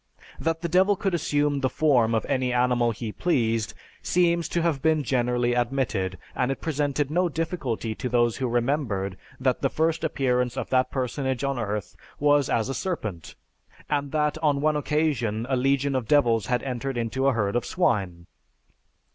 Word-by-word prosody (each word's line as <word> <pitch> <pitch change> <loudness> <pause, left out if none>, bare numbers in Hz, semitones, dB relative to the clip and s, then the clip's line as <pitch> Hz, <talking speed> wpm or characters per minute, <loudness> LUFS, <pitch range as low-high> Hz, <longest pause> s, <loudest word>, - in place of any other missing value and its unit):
That 165 0 -1
the 170 - -1
Devil 190 +4 +4
could 195 0 -2
assume 145 -3 +1
the 130 -1 +1
form 125 -8 +3
of 110 - 0
any 130 -1 0
animal 125 -1 +2
he 115 -1 -4
pleased, 115 -8 0 0.3
seems 170 -2 +1
to 170 - 0
have 160 -6 0
been 160 -2 +2
generally 120 -1 +1
admitted, 120 -7 -1 0.2
and 125 +1 0
it 135 - -3
presented 145 -2 -1
no 175 +2 +2
difficulty 150 -9 -3
to 125 - -4
those 120 -1 +2
who 130 - -1
remembered 120 -6 -1 0.2
that 130 -1 +1
the 135 - +2
first 160 +2 0
appearance 125 -5 0
of 130 - -4
that 130 -1 +3
personage 130 0 -2
on 140 -2 -1
earth 105 -3 -3 0.2
was 145 -1 +3
as 115 0 +1
a 135 - -2
serpent, 110 - -4 0.6
and 145 -1 0
that 150 0 0
on 150 -3 +2
one 155 +1 +2
occasion 145 -8 0
a 130 - +1
legion 135 +2 +1
of 125 -4 -1
devils 115 -7 +3
had 125 -1 0
entered 135 0 -3
into 120 +4 0
a 135 - +4
herd 105 -2 0
of 120 - +1
swine. 95 - 0
130 Hz, 175 wpm, -25 LUFS, 120-150 Hz, 0.6 s, Devil